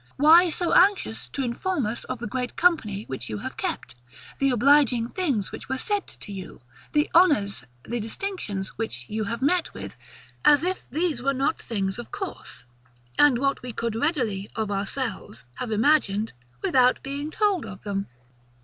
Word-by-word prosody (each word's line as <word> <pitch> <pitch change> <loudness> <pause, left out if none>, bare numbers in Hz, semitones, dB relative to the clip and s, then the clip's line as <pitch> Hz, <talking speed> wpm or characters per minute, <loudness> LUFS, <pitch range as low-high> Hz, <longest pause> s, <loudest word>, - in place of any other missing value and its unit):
Why 330 +5 +7
so 345 +2 0
anxious 380 - +3
to 275 - -3
inform 260 - -1
us 220 +3 -3
of 255 - -4
the 235 - -6
great 250 +2 -3
company 230 - +2
which 130 - -6
you 105 - -3
have - - -6
kept; - - -4 0.5
the 275 - +3
obliging 250 -2 +4
things 275 - -1
which - - -9
were 265 - -1
said 410 +7 -1
to 205 - -9
you; 190 -3 -8 0.3
the 295 0 +2
honours, 280 - +4 0.2
the 240 +1 -3
distinctions 220 - -3
which 225 - -3
you 215 0 -1 0.2
met 340 +5 +1
with; - - -7 0.5
as 295 0 +6
if 370 +1 -1
these 310 -2 -1
were 275 +2 +1
not 275 +5 0
things 195 -2 -2
of 240 - -8
course, 400 -2 -6 0.6
and 290 -4 +6
what 275 +2 0
we 245 -1 -6
could 230 -1 -2
readily, 225 - -1
of 220 -2 -2
ourselves, 205 - -4
have 250 - -4
imagined, 220 -3 +2 0.3
without 255 -1 +3
being 280 +2 -4
told 400 -1 +1
of 185 -3 -10
them? 200 -1 -2
255 Hz, 165 wpm, -25 LUFS, 215-310 Hz, 0.6 s, Why